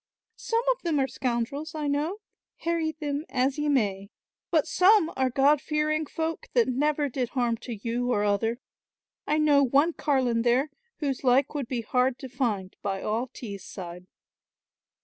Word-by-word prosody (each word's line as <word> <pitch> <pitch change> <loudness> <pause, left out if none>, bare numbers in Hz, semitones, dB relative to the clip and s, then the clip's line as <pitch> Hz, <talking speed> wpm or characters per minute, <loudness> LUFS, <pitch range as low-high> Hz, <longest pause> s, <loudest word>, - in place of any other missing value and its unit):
"Some 460 +1 0
of - - -3
them 330 -4 0
are 265 - +2
scoundrels, 260 +5 -3
I 305 -1 -3
know, 300 +8 -1 0.4
harry 330 -1 0
them 295 -1 -3
as 265 +2 0
ye 295 0 0
may, 200 -7 0 0.4
but 320 -4 +3
some 365 +1 +4
are 260 -1 +1
god 275 +3 +3
fearing 305 0 0
folk 325 +2 -3
that 475 - +4
never 290 +3 +1
did 250 -2 -2
harm 240 -3 0
to 240 0 -6
you 235 +4 -2
or 205 -3 +2
other. 210 +3 +1 0.7
I 300 - +2
know 295 -2 +5
one 280 +5 +3
carline 260 -7 +1
there, 250 +5 +2 0.3
whose 275 -3 -2
like 260 +3 +3
would 285 -5 -3
be 245 -2 -2
hard 250 +3 +1
to 260 +1 -8
find 215 -8 -2
by 195 -1 -3
all 225 +4 -1
Tees 205 -6 -8
side." 180 -1 -8
270 Hz, 170 wpm, -27 LUFS, 235-300 Hz, 0.7 s, know